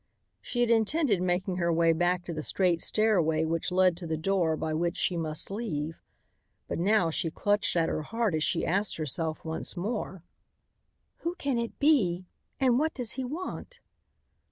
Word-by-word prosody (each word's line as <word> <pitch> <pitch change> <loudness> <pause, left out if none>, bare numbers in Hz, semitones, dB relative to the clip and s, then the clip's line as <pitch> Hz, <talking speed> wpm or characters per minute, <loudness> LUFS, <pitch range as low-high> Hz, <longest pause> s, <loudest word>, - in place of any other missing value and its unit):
She 245 - -2
had 240 -1 +3
intended 225 - +2
making 180 +1 0
her 170 -1 +1
way 165 0 +4
back 175 +2 0
to 170 - -4
the 155 - -3
straight 175 +1 +1
stairway 170 -8 +2
which 165 +2 -1
led 185 -1 +4
to 175 -1 -6
the 160 0 -1
door 165 -2 +1
by 155 0 -2
which 170 +2 -1
she 180 - +1
must 155 +1 -3
leave. 165 -8 -4 0.7
But - - -3
now 185 -2 +3
she 165 +1 0
clutched 205 +5 0
at 165 -1 +2
her - - -1
heart 225 +3 -1
as 155 -1 0
she - - 0
asked 200 +4 0
herself 155 +1 -3
once 160 +3 -3
more: 190 -2 -3 0.9
"Who 340 +1 -3
can 280 -8 -1
it 235 -1 -4
be? 195 - +3 0.3
And 255 -2 +3
what 315 +2 0
does 245 -4 -2
he 260 - -1
want?" 365 - -6
180 Hz, 180 wpm, -29 LUFS, 165-225 Hz, 0.9 s, way